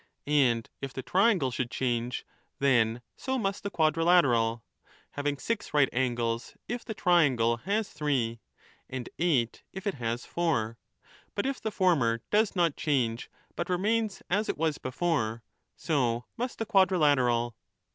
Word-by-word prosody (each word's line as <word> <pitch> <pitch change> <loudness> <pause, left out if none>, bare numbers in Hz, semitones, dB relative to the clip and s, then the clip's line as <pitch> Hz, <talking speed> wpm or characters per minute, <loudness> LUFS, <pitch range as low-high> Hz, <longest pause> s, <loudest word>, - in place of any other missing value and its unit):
And 130 -6 +2
if 135 -2 -5
the 130 - -5
triangle 185 - +3
should 120 0 -2
change, 120 -1 -2 0.3
then 120 -3 +2
so 265 0 -2
must 195 -4 -1
35 - - -35
the 200 - -2
quadrilateral, 155 -9 +3 0.5
having 145 0 -2
six 230 0 -3
right 145 -3 +5
angles 120 -2 -1
if 240 +1 -4
the 220 - -6
triangle 135 - +3
has 200 - -1
three, 130 -7 -1 0.5
and 125 -2 -5
eight 140 -10 +1
if 190 +1 -7
it 200 - 0
has 120 -1 -3
four: 115 -10 -1 0.6
but 200 - -1
if 275 0 -2
the 220 - -1
former 145 - +2
does 215 0 +2
not 170 -5 +2
change 125 -6 0 0.3
but 170 - -3
remains 210 +3 0
as 205 +4 0
it - - -1
was 155 -1 0
before, 125 -6 -1 0.3
so 125 -6 0
must 245 +1 -3
the 225 - -2
quadri 190 -3 +4
lateral. 120 -6 +2
145 Hz, 150 wpm, -29 LUFS, 120-185 Hz, 0.6 s, right